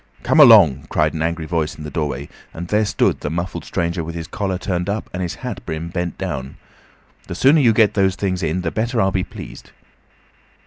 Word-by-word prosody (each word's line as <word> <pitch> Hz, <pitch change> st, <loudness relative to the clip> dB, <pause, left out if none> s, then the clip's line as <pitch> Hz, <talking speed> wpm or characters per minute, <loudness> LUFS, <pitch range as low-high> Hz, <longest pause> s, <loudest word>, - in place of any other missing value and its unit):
"Come 160 Hz, -, +2 dB
along," 100 Hz, -, +7 dB
cried -, -, +1 dB
an 80 Hz, -, -4 dB
angry 85 Hz, 0 st, -2 dB
voice 80 Hz, -2 st, -2 dB
in 75 Hz, -, -8 dB
the 75 Hz, -, -7 dB
doorway, 70 Hz, -2 st, -3 dB, 0.3 s
and 85 Hz, +1 st, -6 dB
there 105 Hz, +1 st, +2 dB
stood -, -, +1 dB
the -, -, -4 dB
muffled 85 Hz, +3 st, -4 dB
stranger 85 Hz, 0 st, -2 dB
with 85 Hz, +1 st, -7 dB
his 85 Hz, -1 st, -5 dB
collar 95 Hz, +1 st, -3 dB
turned 90 Hz, 0 st, -2 dB
up, 105 Hz, +1 st, -3 dB
and 90 Hz, -, -3 dB
his 90 Hz, -2 st, -3 dB
hat 125 Hz, -6 st, -5 dB
brim 80 Hz, +1 st, -5 dB
bent 90 Hz, -1 st, -4 dB
down. 65 Hz, +1 st, -5 dB, 0.7 s
"The -, -, -5 dB
sooner 145 Hz, +4 st, +5 dB
you 120 Hz, -4 st, +5 dB
get 110 Hz, -1 st, +3 dB
those 95 Hz, -2 st, +2 dB
things 95 Hz, -2 st, -2 dB
in 85 Hz, +2 st, -1 dB
the 85 Hz, -2 st, -2 dB
better 115 Hz, +2 st, -1 dB
I'll 95 Hz, -2 st, +2 dB
be 95 Hz, -1 st, 0 dB
pleased." -, -, -10 dB
90 Hz, 215 wpm, -20 LUFS, 80-100 Hz, 0.7 s, along